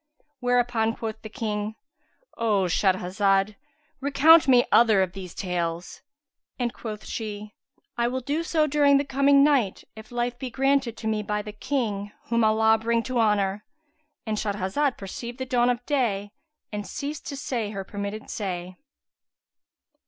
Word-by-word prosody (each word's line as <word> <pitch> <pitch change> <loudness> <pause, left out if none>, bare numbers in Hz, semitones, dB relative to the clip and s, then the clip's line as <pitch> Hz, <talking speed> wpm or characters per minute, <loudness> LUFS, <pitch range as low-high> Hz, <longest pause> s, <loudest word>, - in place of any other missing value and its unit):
'" - - -47
Whereupon 245 -2 +1
quoth 220 -1 -5
the 220 - -8
King, 215 -2 -3 0.6
"O 215 -4 +1
Shahrazad, 195 +2 +1 0.4
recount 290 +3 +6
me 250 -2 +6
other 220 -5 +5
of 180 -2 -4
these 185 -3 -8
tales!"; 175 -2 -3 0.6
and 245 -2 -1
quoth 215 -4 -7
she, 210 -1 -6 0.5
"I 235 - +3
will 255 +2 -1
do 290 +5 -1
so 320 -2 +1
during 285 -1 +4
the 280 - 0
coming 275 +1 +4
night, 270 -10 +2
if 220 +1 -12
life 240 0 -2
be 260 - -4
granted 270 -2 +1
to 220 -1 -2
by 210 0 -2
the 210 - -7
King 210 -3 -2 0.2
whom 235 -1 +2
Allah 220 0 +4
bring 230 0 +1
to 255 -1 -2
honour!"—And 225 +6 -2
Shahrazad 210 +7 -1
perceived 235 +5 -7
the 260 - -4
dawn 245 -1 +2
of 245 0 -1
day 210 -8 0 0.4
and 210 -1 -5
ceased 295 0 -5
to 280 - -5
say 235 -6 -2
her 200 -2 -5
permitted 205 +2 -6
say. 180 -3 -4
225 Hz, 150 wpm, -25 LUFS, 205-260 Hz, 0.6 s, recount